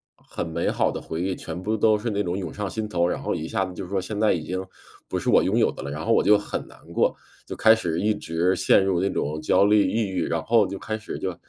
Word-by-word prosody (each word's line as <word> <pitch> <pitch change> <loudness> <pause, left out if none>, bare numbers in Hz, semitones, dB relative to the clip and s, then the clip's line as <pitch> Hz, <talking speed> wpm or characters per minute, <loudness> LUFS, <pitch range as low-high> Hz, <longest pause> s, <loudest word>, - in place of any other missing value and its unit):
很 - - -6
美 85 +1 -1
好 - - +1
的 - - -5
回 80 +1 -5
忆 95 -1 -1
全 90 - -7
部 110 +2 0
都 110 0 +4
是 115 +2 -3
那 105 0 0
种 90 0 -2
涌 95 - -5
上 105 -2 -3
心 110 +3 -3
头， 85 -2 +1
然 - - -2
后 - - -1
一 80 - -4
下 95 -4 -1
子 90 - -8
就 90 -1 -7
说 95 0 -1
现 105 +3 -5
在 110 - +4
已 80 -3 -3
经 95 +2 -3 0.4
不 - - -2
是 - - -5
我 - - +6
拥 - - +1
有 - - +3
的 - - -9
了， 70 - -5
然 75 +3 -5
后 115 - +3
我 - - +4
就 105 0 +6
很 105 - -5
难 - - -16 0.2
过。 - - +2 0.3
就 - - -5
开 110 0 +6
始 85 -7 -1
一 105 +1 +2
直 85 +2 0
陷 95 - +4
入 90 -2 +1
那 100 - +1
种 75 -2 -2
焦 100 - +3
虑 105 0 +4
抑 110 -3 0
郁， 90 -3 -1
然 85 -1 -1
后 115 -4 +3
就 100 +1 -5
开 110 +2 -4
始 105 - -6
就 95 -2 -3
95 Hz, 315 characters per minute, -24 LUFS, 85-105 Hz, 0.4 s, 我